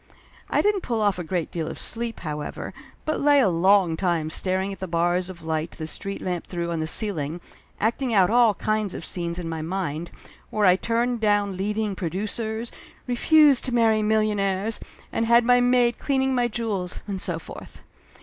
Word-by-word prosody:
I - - +2
didn't 415 -2 +2
pull 235 -7 -2
off 205 -4 +1
a - - -3
great 170 0 -2
deal 165 -2 -3
of - - -6
sleep, 230 0 -2
however, 150 -3 -5 0.3
but 310 - -1
lay 290 0 +5
a 235 -8 +4
long 180 0 +3
time 165 -3 -1
staring 190 +3 -1
at 195 - -11
the 190 - -4
bars 175 +2 0
of 170 -3 -10
light 160 0 -2
the 155 - -4
street 195 +5 -5
lamp 180 -2 -3
threw 170 -1 -3
on 165 - -2
the 155 - -2
ceiling, 165 -5 0 0.4
acting 235 +4 0
out 195 -3 +4
all 235 -3 +5
kinds 215 -2 -1
of - - -6
scenes 170 -1 -3
in 175 -2 -4
my 160 -1 -4
mind, 170 -1 -3 0.4
where 210 -1 +1
I 180 -1 +6
turned 235 +4 0
down 205 -2 +2
leading 210 +1 -2
producers, 215 +6 -3 0.3
refused 285 +2 +4
to 250 -2 -1
marry 225 -2 +3
millionaires, 210 -1 0 0.3
and 225 - 0
had 235 0 +5
my 245 0 +5
maid 245 -1 +3
clean 270 -2 +1
ing 265 0 +1
my 245 -1 +2
jewels, 210 -6 -2
and 195 -2 -3
so 175 -3 -1
forth. 165 - -11
200 Hz, 190 wpm, -24 LUFS, 175-230 Hz, 0.4 s, I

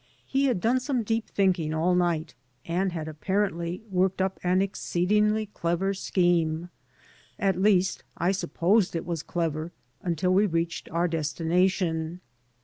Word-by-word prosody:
He 275 +1 +1
had 250 -8 +1
done 240 +7 +2
some 255 -2 -1
deep 225 +1 -1
thinking 180 -6 +1
all 170 +3 +2
night 170 -3 0 0.3
and 180 +3 0
had 160 -2 -4
apparently 175 +2 -2
worked 185 +1 +1
up 190 0 -1
an 180 +1 +2
exceedingly 210 +3 +1
clever 190 -1 -1
scheme. 175 -3 +1 0.7
At 190 -2 +1
least 190 -2 +3
I 175 +3 +2
supposed 185 +1 +1
it 165 - -2
was 170 -3 -3
clever 165 -1 -2 0.3
until 180 +1 0
we 200 +3 +4
reached 165 -1 -2
our 170 +2 +1
desti 160 -1 -3
nation. 175 -1 +1
180 Hz, 140 wpm, -27 LUFS, 165-195 Hz, 0.7 s, we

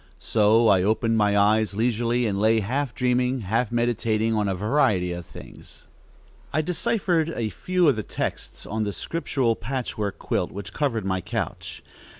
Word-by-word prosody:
So 110 +1 +3
I 95 -3 +5
opened 110 +3 +1
my 105 -1 +3
eyes 105 0 +3
leisurely 120 +2 +1
and 100 -3 -1
lay 110 +2 +3
half 130 +3 -2
dreaming, 125 0 +1
half 110 +4 -1
meditating 115 -2 0
on 105 -2 +1
a 95 - 0
variety 100 -4 +1
of 85 -1 -6
things. - - -13 0.7
I 155 - +1
deciphered 180 -2 0
a 110 -2 -2
few 180 -2 +1
of 135 -6 +3
the - - -1
texts - - -5
on 110 +1 -2
the 100 -1 -2
scriptural 135 -7 -1
patchwork 115 -5 -4
quilt - - -2
which 100 0 -8
covered 120 -9 -1
my 95 -1 -1
couch. - - -5
115 Hz, 160 wpm, -24 LUFS, 105-125 Hz, 0.7 s, I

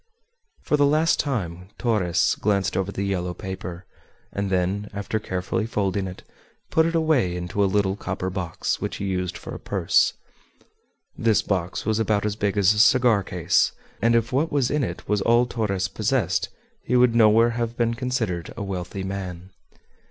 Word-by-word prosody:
For 150 - +1
the 145 - +4
last 155 +3 +3
time 90 - -2
Torres 105 -8 +1
glanced 100 -3 0
over 95 +1 -1
the 100 - -3
yellow 90 -3 -2
paper, 95 -1 -7 0.5
and 100 0 -2
then, 95 +3 0
after 100 +2 -2
carefully 95 +2 -2
folding 100 -3 -1
it, 90 - -9 0.5
put 160 0 +4
it 165 - -2
away 155 - +2
into 90 +3 -1
a 100 - +2
little 100 -1 +1
copper 95 -2 -4
box 90 -4 -3
which - - -3
he 100 - -4
used 90 -2 -2
for - - -8
a - - -7
purse. - - +2 1.0
This 115 -2 +2
box 95 -2 -2
was 110 0 +1
about 105 -2 +1
as 105 -1 -1
big 100 -1 -1
as 100 +1 +5
a 105 - -2
cigar 120 -3 +5
case, 90 -1 +1 0.3
and 115 +2 +3
if 115 +1 +1
what 150 +5 +1
was 135 -4 +1
in 150 -1 +1
it 85 -7 -5
was 105 -1 +1
all 120 +4 +4
Torres 100 -6 -1
possessed 95 - 0 0.3
he 125 - 0
would 125 -1 +5
nowhere 115 +1 +5
have 115 0 -3
been 115 -1 +1
considered 115 -8 -2
a 105 - -3
wealthy 95 0 -4
man. 95 -1 -6
100 Hz, 175 wpm, -24 LUFS, 95-115 Hz, 1.0 s, as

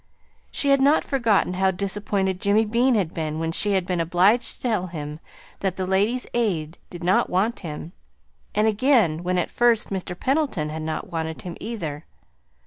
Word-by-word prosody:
She 280 - 0
had 275 -1 +4
not 285 +3 +4
forgotten 230 -9 +2
how 190 +1 +2
disappointed 195 0 -1
Jimmy 210 +2 +3
Bean 240 +4 +2
had 185 -7 0
been 155 -1 -3
when 165 0 -2
she 205 +4 +1
had 190 -2 +1
been 180 -1 -1
obliged 185 +8 +2
to - - -18
tell 215 -7 0
him 150 -3 -6 0.4
that 190 -2 -1
the 190 - -2
Ladies' 205 +7 +1
Aid 180 -9 -1
did 175 0 -8
not 180 +2 +2
want 205 +6 0
him, 160 -1 -7 0.6
and 210 - +3
again 220 - +3
when 180 +1 -1
at 175 - -1
first 235 -3 +2
Mr. 185 -2 -4
Pendleton 265 - 0
had 155 +1 -5
not 155 +4 -4
wanted 160 -1 -4
him, 175 -2 -6
either. 165 -10 -5
190 Hz, 180 wpm, -24 LUFS, 170-225 Hz, 0.6 s, had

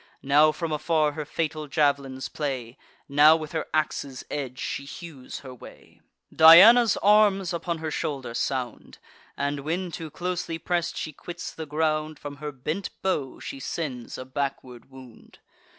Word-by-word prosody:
Now 150 +3 +5
from 165 0 -4
afar 155 0 +1
her 150 +1 -5
fatal 155 0 -3
jav'lins 140 -3 0
play; 130 -5 -4 0.3
Now 150 +3 +6
with 155 -2 -5
her 160 - -3
ax's 140 -4 -2
edge 130 -3 -4
she 140 - -4
hews 140 -2 -9
her 130 -2 -10
way: 125 - -15 0.3
Diana's 205 +9 +8
arms 200 -3 +4
upon 170 0 -3
her 160 -1 -4
shoulder 135 -5 -3
sound; 125 0 -3 0.4
And 140 0 -1
when, 170 +5 -3
too 160 -1 -6
closely 175 0 -3
press'd, 170 0 -2
she 155 - -4
quits 175 +4 -8
the 160 -1 -7
ground, 155 0 -1
From 145 0 -8
her 150 +1 -5
bent 155 +8 -4
bow 150 -9 -1
she 135 - -7
sends 135 -4 -5
a 130 - -7
backward 130 -2 -5
wound. 130 -3 -15
150 Hz, 150 wpm, -26 LUFS, 135-165 Hz, 0.4 s, Diana's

